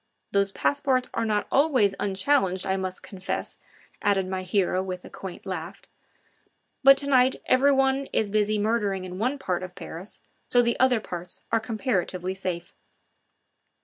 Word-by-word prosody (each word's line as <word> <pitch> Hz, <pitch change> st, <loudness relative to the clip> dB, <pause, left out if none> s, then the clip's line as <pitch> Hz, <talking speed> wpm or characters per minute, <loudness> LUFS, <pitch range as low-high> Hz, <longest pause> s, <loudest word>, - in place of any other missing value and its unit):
Those 200 Hz, 0 st, +2 dB
passports 265 Hz, +1 st, 0 dB
are 230 Hz, -, 0 dB
not 210 Hz, -1 st, 0 dB
always 265 Hz, -9 st, +3 dB
unchallenged, 195 Hz, -1 st, +1 dB
I 190 Hz, -, +1 dB
must 185 Hz, -1 st, -4 dB
confess," 190 Hz, -1 st, -5 dB, 0.4 s
added 195 Hz, -2 st, +2 dB
my 185 Hz, 0 st, -2 dB
hero 185 Hz, 0 st, +1 dB
with 185 Hz, -1 st, -5 dB
a -, -, -11 dB
quaint 190 Hz, -2 st, -8 dB
laugh; 175 Hz, -3 st, -6 dB, 1.0 s
"but 275 Hz, 0 st, +9 dB
to 280 Hz, -, -4 dB
night 260 Hz, -2 st, +4 dB
everyone 270 Hz, 0 st, +3 dB
is 210 Hz, -2 st, 0 dB
busy 215 Hz, 0 st, +2 dB
murdering 205 Hz, -3 st, 0 dB
in 180 Hz, 0 st, -7 dB
one 255 Hz, +6 st, 0 dB
part 185 Hz, -10 st, -2 dB
of 185 Hz, -1 st, -8 dB
Paris, 180 Hz, +6 st, -8 dB, 0.3 s
so 245 Hz, 0 st, +4 dB
the 235 Hz, 0 st, 0 dB
other 255 Hz, -3 st, +4 dB
parts 175 Hz, -3 st, -7 dB
are 225 Hz, -, +3 dB
comparatively 200 Hz, -5 st, -2 dB
safe." 180 Hz, -2 st, -5 dB
205 Hz, 150 wpm, -26 LUFS, 185-255 Hz, 1.0 s, but